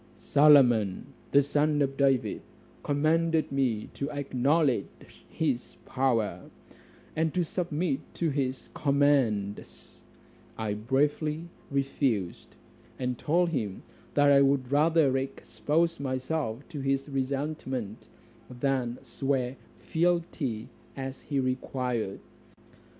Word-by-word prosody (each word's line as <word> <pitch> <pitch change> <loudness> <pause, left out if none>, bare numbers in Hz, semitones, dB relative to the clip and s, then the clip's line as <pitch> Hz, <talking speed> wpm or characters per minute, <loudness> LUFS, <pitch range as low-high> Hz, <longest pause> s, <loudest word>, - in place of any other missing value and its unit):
"Solomon, 125 -9 +4 0.2
the 140 0 +6
son 145 +1 +1
of 135 0 -2
David, 135 -2 +1 0.4
commanded 160 +2 +1
me 125 -6 0
to 140 - -3
acknowledge 140 -2 -1
his 140 -7 -2
power, 115 -9 0 0.7
and 160 0 +1
to 180 - +2
submit 165 -3 -1 0.2
to 165 -3 0
his 135 -2 -3
commands: 135 -8 0 0.6
I 110 -2 -2
bravely 150 +8 0 0.2
refused, 135 -9 -1 0.4
and 125 -1 -2
told 170 +3 +2
him, 110 - -3 0.3
I 145 -1 +6
would 135 -2 +2
rather 150 -2 +4
expose 155 +5 -1
myself 130 -1 -3
to 155 -5 -6
his 135 +1 0
resentment, 135 -5 -3 0.4
than 125 -1 -1
swear 135 -2 -1 0.2
fealty 165 -9 -1 0.3
as 135 0 -5
he 140 -2 -2
required. 125 -5 -2
135 Hz, 95 wpm, -28 LUFS, 125-150 Hz, 0.7 s, the